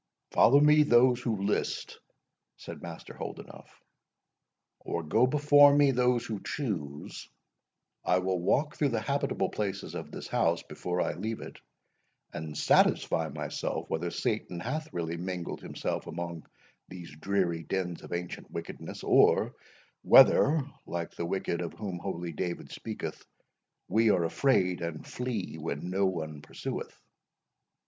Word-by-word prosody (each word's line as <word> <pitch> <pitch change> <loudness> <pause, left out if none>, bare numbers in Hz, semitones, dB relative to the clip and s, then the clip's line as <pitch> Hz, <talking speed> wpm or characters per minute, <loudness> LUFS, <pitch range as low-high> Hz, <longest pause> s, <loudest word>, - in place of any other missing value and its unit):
"Follow 140 +4 +6
me 150 +1 +6
those 125 -3 +5
who 110 -6 -1
list," 105 - -2 0.6
said - - -9
Master - - -8
Holdenough, - - -8 1.1
"or 85 - -3
go 110 +11 +3
before 145 0 +6
me 145 -1 +5
those 125 -1 +2
who 110 -3 -4
choose, 80 - -5 0.7
I 90 - +3
will 90 0 0
walk 145 - +1
through 145 - +1
the 115 - 0
habitable 140 +6 -1
places 100 -2 -3
of - - -6
this - - -7
house - - +1
before 90 0 -3
I - - 0
leave 110 +1 -4
it, - - -10 0.7
and 75 -1 -6
satisfy 80 +1 +3
myself 75 +1 -4
whether 85 +2 -1
Satan 85 +1 -2
hath 155 - -4
really 85 -1 -3
mingled 90 0 -4
himself - - -4
among 85 -2 -6 0.4
these 85 -5 -10
dreary 90 0 0
dens 90 +1 -3
of - - -12
ancient 85 0 -5
wickedness, - - -7
or - - +4 0.5
whether, 150 +2 +7 0.3
like 85 -1 -4
the 85 - -4
wicked 90 -2 -2
of 85 - -4
whom 95 -5 -5
holy 85 -2 -4
David 85 +2 -4
speaketh, - - -6 0.6
we 110 +3 +3
are 90 - +3
afraid, 90 -1 +2
and 85 -2 -5
flee 115 -9 -4
when 80 +3 -4
no 95 +1 +2
one 80 -5 -4
pursueth." - - -6
95 Hz, 140 wpm, -29 LUFS, 85-125 Hz, 1.1 s, whether